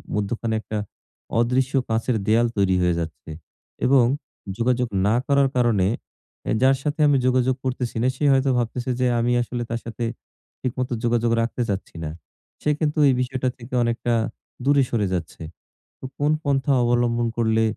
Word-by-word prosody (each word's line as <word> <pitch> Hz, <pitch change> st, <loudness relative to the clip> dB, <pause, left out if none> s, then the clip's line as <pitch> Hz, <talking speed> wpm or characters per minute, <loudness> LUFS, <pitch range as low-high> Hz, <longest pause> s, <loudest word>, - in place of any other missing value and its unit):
মধ্যখানে 110 Hz, +2 st, -2 dB
একটা 110 Hz, -, -5 dB, 0.6 s
অদৃশ্য 130 Hz, +3 st, +1 dB, 0.2 s
কাঁচের 115 Hz, +2 st, 0 dB
দেওয়াল 115 Hz, +2 st, +4 dB
তৈরি 95 Hz, -2 st, +3 dB
হয়ে 90 Hz, -1 st, +2 dB
যাচ্ছে। 80 Hz, -1 st, -6 dB, 0.6 s
এবং 130 Hz, -2 st, +5 dB, 0.5 s
যোগাযোগ 125 Hz, 0 st, +1 dB, 0.2 s
না 110 Hz, -, +3 dB
করার 140 Hz, -1 st, +3 dB
কারণে, 115 Hz, -7 st, +3 dB, 0.6 s
এ -, -, +1 dB
যার 135 Hz, 0 st, +5 dB
সাথে 150 Hz, +1 st, -2 dB
আমি 140 Hz, -2 st, +4 dB
যোগাযোগ 130 Hz, 0 st, +2 dB
করতেছি 125 Hz, -2 st, -2 dB
না -, -, +3 dB
সে 150 Hz, -, -5 dB
হয়তো 135 Hz, 0 st, +2 dB
ভাবতেছে 120 Hz, +2 st, -2 dB
যে 125 Hz, -, +2 dB
আমি 120 Hz, +1 st, +1 dB
আসলে 120 Hz, 0 st, -3 dB
তার 115 Hz, 0 st, -2 dB
সাথে 115 Hz, +1 st, -5 dB, 0.6 s
ঠিকমতো 125 Hz, 0 st, -2 dB
যোগাযোগ 120 Hz, 0 st, +1 dB
রাখতে 115 Hz, +2 st, -2 dB
চাচ্ছি 95 Hz, -3 st, -4 dB
না। 75 Hz, -, -3 dB, 0.5 s
সে 150 Hz, -, 0 dB
কিন্তু 155 Hz, -1 st, 0 dB
এই 135 Hz, -, +5 dB
বিষয়টা 130 Hz, 0 st, -1 dB
থেকে 120 Hz, +1 st, -12 dB
অনেকটা 120 Hz, 0 st, 0 dB, 0.5 s
দূরে 140 Hz, -1 st, +4 dB
সরে 105 Hz, -5 st, 0 dB
যাচ্ছে। 80 Hz, -2 st, -4 dB, 0.6 s
তো -, -, -9 dB
কোন 145 Hz, +1 st, +2 dB
পন্থা 140 Hz, -1 st, +1 dB
অবলম্বন 120 Hz, 0 st, +1 dB
করলে 110 Hz, -1 st, +2 dB
120 Hz, 160 wpm, -23 LUFS, 115-130 Hz, 0.6 s, এবং